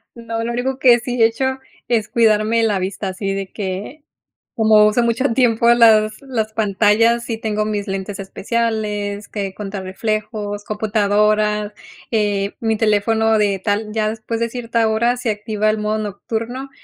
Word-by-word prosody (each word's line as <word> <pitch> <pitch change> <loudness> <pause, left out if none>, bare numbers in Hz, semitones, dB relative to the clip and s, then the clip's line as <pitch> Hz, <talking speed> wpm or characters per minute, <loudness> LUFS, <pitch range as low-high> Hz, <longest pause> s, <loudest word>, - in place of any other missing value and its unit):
No, 230 -1 -4
lo 235 - -2
único 255 +2 -2
que 245 -3 +5
sí 245 0 -3
he - - +8
hecho 260 +4 -1 0.3
es 225 -3 +1
cuidarme 225 -1 +2
la 215 -3 +1
vista, 190 +2 -3
así 195 +1 -3
de 195 -1 -5
que, 205 +9 -5 0.5
como 215 -1 +5
uso 215 +3 +2
mucho 235 +3 0
tiempo 235 -2 +3
las 220 0 +4
las 225 -5 -3
pantallas, 220 +3 +2
sí 230 - -3
tengo 215 -1 -2
mis 205 -1 -2
lentes 195 +1 -4
especiales 210 0 -2
que 200 -2 -4
contra 200 0 -6
reflejos, 210 +1 -3
computadoras, 210 0 +1 0.4
eh, 205 -3 0
mi 225 -1 0
teléfono 220 +1 +2
de 205 -2 +1
tal 210 +2 -2
ya 215 -1 0
después 225 +1 -4
de 235 - 0
cierta 230 -1 -1
hora 235 +3 +1
se 240 -3 -1
activa 210 0 -1
el 215 - +2
modo 210 +1 -1
nocturno 225 +5 -5
215 Hz, 160 wpm, -19 LUFS, 205-230 Hz, 0.5 s, he